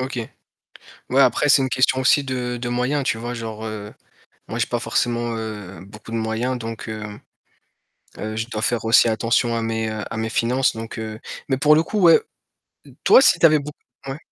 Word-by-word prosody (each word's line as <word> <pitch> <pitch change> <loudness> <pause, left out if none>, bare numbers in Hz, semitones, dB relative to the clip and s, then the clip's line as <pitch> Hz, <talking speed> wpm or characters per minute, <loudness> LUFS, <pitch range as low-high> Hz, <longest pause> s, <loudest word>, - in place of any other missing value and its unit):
OK. 130 0 -4 0.9
Ouais 135 +2 +4
après 135 +3 +3
c'est 140 - +6
une 130 - 0
question 130 +1 +2
aussi 130 +2 +3
de 125 -2 -3
de 120 0 -4
moyens, 125 +4 0
tu 110 - -1
vois? 120 +2 -5
Genre, 110 -2 -6
heu, 105 -1 -7 0.5
moi - - -5
j'ai - - +1
pas - - -2
forcément, 120 -1 -1
heu, 105 -4 -7
beaucoup 105 +2 -13
de 115 - -3
moyens 115 +3 -2
donc 115 -1 -7
heu 110 -1 -6 1.2
heu, 110 0 -5
je 110 +1 -3
dois 110 -2 -5
faire 120 -1 0
aussi 115 +1 +5
attention 115 +1 +1
à 115 - -1
mes 110 0 -2
à 110 +1 -5
mes 110 0 -2
finances 125 +3 +1
donc 115 0 -7
heu 110 -1 -6 0.3
mais 135 - 0
pour 150 +3 +5
le 160 - +3
coup 210 - -3
ouais, 170 -2 +7 0.8
toi - - +7
si 190 -10 +5
tu - - +5
avais 155 -1 +6
beau 145 +1 -7 0.4
ouais. 135 +1 -4
120 Hz, 200 wpm, -21 LUFS, 110-130 Hz, 1.2 s, ouais